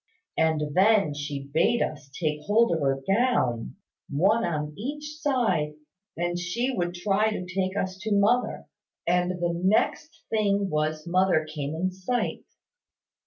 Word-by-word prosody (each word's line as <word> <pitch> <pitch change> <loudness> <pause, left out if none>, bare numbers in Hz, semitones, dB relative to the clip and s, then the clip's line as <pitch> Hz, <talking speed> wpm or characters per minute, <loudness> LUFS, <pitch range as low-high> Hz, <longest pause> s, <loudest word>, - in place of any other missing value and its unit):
And 150 -2 +1
then 195 -3 +4
she 145 -1 -5
bade 205 +9 +3
us 145 -2 -6
take 150 -3 0
hold 220 0 +4
of 165 - +1
her 135 -2 0
gown, 195 - +1 0.3
one 195 +11 +3
on 150 -4 -2
each 295 +7 -5
side, 210 - +1 0.4
and 175 +1 -1
she 235 +10 -1
would 175 -7 -2
try 200 +4 +2
to 195 -4 -4
take 185 +2 -2
us 190 -1 -2
to 215 +2 -4
mother; 210 +5 +2 0.4
and 180 +1 +2
the 175 -1 -1
next 215 - 0
thing 200 -2 +1
was 155 0 -1
mother 180 -2 +2
came 155 -1 -4
in 185 +3 -1
sight. 190 +7 -2
180 Hz, 145 wpm, -26 LUFS, 155-215 Hz, 0.4 s, then